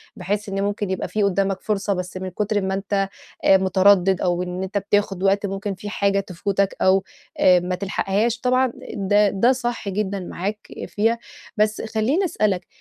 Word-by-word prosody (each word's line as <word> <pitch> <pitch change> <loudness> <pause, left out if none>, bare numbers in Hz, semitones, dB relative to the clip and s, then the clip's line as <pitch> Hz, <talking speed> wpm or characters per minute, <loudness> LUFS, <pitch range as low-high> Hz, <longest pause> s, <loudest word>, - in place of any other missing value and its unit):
بحيث 200 +3 -3
إن 195 0 -1
ممكن 205 0 -2
يبقى 190 - -2
في 215 - -1
قدّامك 195 0 +1
فرصة 205 -1 -1
بس 180 0 -5
من 185 0 -4
كتر 205 +2 -1
ما 190 0 -1
أنت 195 0 -1 0.4
آآ 190 - +7
مُتردد 190 0 +4
أو 175 0 +1
إن 180 +1 -4
أنت 195 +2 -3
بتاخُد 200 -1 0
وقت 195 +1 +2
ممكن 195 +1 -3
في 205 +2 -7
حاجة 200 -1 +1
تفوتك 195 +1 -1
أو 190 0 +4 0.4
آآ، 180 -1 +6
ما 180 +1 -2
تلحقهاش 200 +5 -1
طبعًا 255 0 +2 0.2
د-ه 205 +1 +3
ده 220 +6 +3
صح 240 -5 -2
جدًا 200 0 -2
معاك 195 +3 -5 0.2
فيها، 225 +3 +1 0.4
بس 215 0 +1
خلّيني 225 - 0
اسألك 200 - 0
200 Hz, 175 wpm, -22 LUFS, 190-210 Hz, 0.4 s, آآ